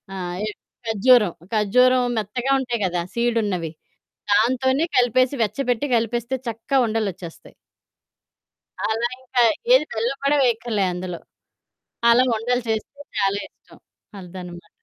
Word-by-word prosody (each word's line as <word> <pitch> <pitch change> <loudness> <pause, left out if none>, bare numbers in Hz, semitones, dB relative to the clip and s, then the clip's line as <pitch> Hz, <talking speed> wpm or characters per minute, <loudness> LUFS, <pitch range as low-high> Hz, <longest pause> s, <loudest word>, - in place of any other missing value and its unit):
ఆహ్, 180 -1 -4
ఇద్ 210 - -7 0.3
ఖర్జూరం. 220 -3 +4 0.2
ఖర్జూరం 250 +4 +4
మెత్తగా 245 +6 -2
ఉంటాయి 240 -4 -3
గదా 175 -1 -1
సీడున్నవి, 215 -8 0 0.6
దాంతోనే 260 +7 +2
కలిపేసి, 255 +2 +3
వెచ్చబెట్టి 250 +3 -1
కలిపేస్తే 235 +2 -1
చక్కగా 230 +5 -1
ఉండలొచ్చేస్తాయి. 200 -6 -5 1.3
అలా 225 +2 0
ఇంకా, 250 -1 0 0.3
ఏది 405 - +5
బెల్లం 235 +5 -1
గూడా 285 +1 +3
వేయక్కర్లే 230 -4 0
అందులో. 180 -1 -5 0.9
అలా 245 +2 +5
ఉండలు 245 +3 -1
చేస్తే 225 +6 -3 0.2
చాలా 195 +1 +1
ఇష్టం - - -21 0.4
అదనమాట. 180 -1 -10
230 Hz, 110 wpm, -22 LUFS, 200-250 Hz, 1.3 s, ఏది